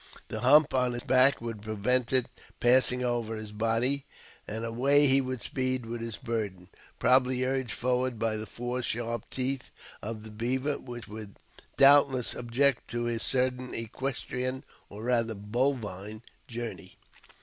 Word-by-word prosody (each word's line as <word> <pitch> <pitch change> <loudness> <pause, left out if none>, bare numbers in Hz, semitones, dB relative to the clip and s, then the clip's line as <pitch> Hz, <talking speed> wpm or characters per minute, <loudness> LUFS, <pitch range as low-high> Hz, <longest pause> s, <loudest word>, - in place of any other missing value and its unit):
The 110 - -4
hump 140 +5 +5
on 125 -1 +2
his 120 - -5
back 130 0 +4
would 115 -3 -6
prevent 110 +4 0
it 130 -2 +5 0.3
passing 125 0 +4
over 120 -2 -1
his 110 -1 -7
body, 115 +6 +1 0.4
and 110 +2 -3
away 135 +6 +3
he 135 0 +5
would 130 -3 -4
speed 130 -2 -1
with 115 0 -5
his 115 -2 -5
burden, 100 -6 -4 0.3
probably 130 0 +3
urged 130 -1 -1
forward 125 0 0
by 110 0 -1
the 110 0 -5
four 120 +4 -3
sharp 115 -2 -3
teeth 130 0 -1 0.3
of 110 0 -6
the 110 - -10
beaver, 130 +6 -1
which 120 -2 -9
would 105 -2 -9 0.4
doubtless 135 -3 +6
object 125 +2 +1
to 120 +1 -3
his 120 -1 -1
sudden 125 -1 0
equestrian 130 +2 -3 0.3
(or 105 +2 -9
rather 115 -2 0
bovine) 105 -2 -2 0.2
journey. 115 -6 -7
120 Hz, 150 wpm, -29 LUFS, 115-130 Hz, 0.4 s, doubtless